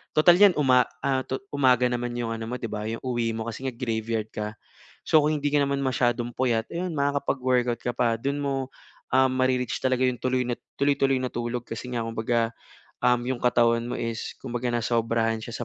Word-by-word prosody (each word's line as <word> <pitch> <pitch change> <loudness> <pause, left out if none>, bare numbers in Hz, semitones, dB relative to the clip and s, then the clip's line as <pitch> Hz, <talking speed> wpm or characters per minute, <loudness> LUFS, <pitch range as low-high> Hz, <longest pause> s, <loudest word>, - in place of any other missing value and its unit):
tutal 175 +3 +6
iyan 200 -4 +7
uma 130 -3 +5 0.2
a 130 -1 +1
tu 130 - -2 0.2
umaga 125 -3 +3
naman 120 0 -2
iyong 120 -1 -2
ano 115 0 -5
mo 125 - -3
'di 115 -2 -5
ba 105 0 -3
iyong 115 +1 -5
uwi 120 -3 -1
mo, 110 - -3
kasi 130 +4 -5
nga 130 - -3
graveyard 115 -2 -2
ka. 105 0 -5 0.5
So 155 - +5
kung 155 +1 +2
hindi 145 0 -1
ka 145 - +3
naman 140 0 -1
masyadong 120 -2 0
puyat, 115 -3 +1
ayon 175 0 -3
makakapag-workout 130 -4 0
ka 125 - 0
pa. 120 -1 +1
Doon 140 +5 -2
mo, 140 -1 -1 0.6
um, 130 0 +5
mare-reach 130 -2 0
talaga 130 -1 +2
iyong 125 - 0
tuloy 130 -1 0
na 120 - -1 0.2
tuloy-tuloy 140 -1 +2
na 130 - -1
tulog, 120 0 -3
kasi 125 +2 -6
nga 120 - -1
kumbaga, 115 0 0 0.5
um, 125 -1 +3
iyong 130 0 -2
katawan 115 -1 +3
mo - - -3
is 115 -1 -4
kumbaga 120 +1 -3
nasobrahan 115 -1 0
siya 120 +1 -5
125 Hz, 200 wpm, -26 LUFS, 115-130 Hz, 0.6 s, iyan